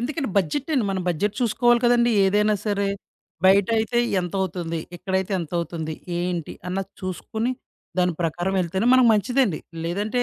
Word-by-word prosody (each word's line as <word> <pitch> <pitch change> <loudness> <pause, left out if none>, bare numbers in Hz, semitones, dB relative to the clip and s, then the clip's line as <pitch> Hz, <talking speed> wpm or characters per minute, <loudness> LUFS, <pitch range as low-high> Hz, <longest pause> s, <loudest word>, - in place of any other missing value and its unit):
ఎందుకంటే, 275 +2 -2
బడ్జెట్టండి. 260 - +1
మనం 190 -1 -2
బడ్జెట్ 195 +5 0
చూసుకోవాలి 240 +1 +3
కదండీ! 240 0 +4
ఏదైనా 210 +2 +3
సరే. 200 -1 +1 0.6
బయటయితే 220 +4 +3 0.2
ఎంతవుతుంది? 175 -2 -3 0.2
ఇక్కడైతే 190 +2 -2
ఎంతవుతుంది? 165 -1 -3 0.2
ఏంటి? 175 -2 -2 0.2
అన్నది 195 +1 -3
చూసుకొని, 220 +6 -3 0.5
దాని 180 -1 +3
ప్రకారం 175 +4 -1
వెళ్తేనే 190 +6 -1
మనకు 255 -2 +6
మంచిదండి. 215 - +1 0.3
లేదంటే 210 +7 -1
195 Hz, 125 wpm, -23 LUFS, 180-235 Hz, 0.6 s, మనకు